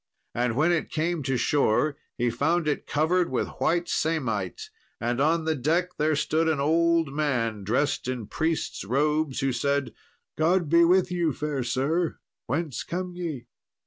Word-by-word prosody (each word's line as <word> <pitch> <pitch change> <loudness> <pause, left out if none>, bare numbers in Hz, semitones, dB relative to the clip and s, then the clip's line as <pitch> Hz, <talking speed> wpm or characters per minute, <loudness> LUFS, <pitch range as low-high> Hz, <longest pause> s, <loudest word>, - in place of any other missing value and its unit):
And 120 -1 0
when 155 +6 +3
it 170 - 0
came 165 +1 -1
to 135 -1 -1
shore, 145 +1 +2 0.2
he 120 0 +1
found 160 +7 +1
it 150 - -1
covered 170 +4 +1
with 130 - -1
white 170 +1 +1
samite, 125 - -2 0.3
and 120 +3 -1
on 160 +2 +2
the 160 - +2
deck 160 +6 +1
there 155 +1 +2
stood 160 +2 +1
an 160 -3 +1
old 165 0 +2
man 120 -8 -1
dressed 130 +7 0
in 125 -4 -3
priest's 160 - -2
robes, 150 +5 0
who 135 0 +1
said, 140 +1 -1 0.5
"God 170 0 +2
be 170 +1 +6
with 180 +1 +3
you, 170 -4 0
fair 145 -1 -2
sir; 150 +8 0 0.3
whence 150 0 -2
come 180 +1 -4
ye?" 160 -9 -5
150 Hz, 160 wpm, -26 LUFS, 130-165 Hz, 0.5 s, be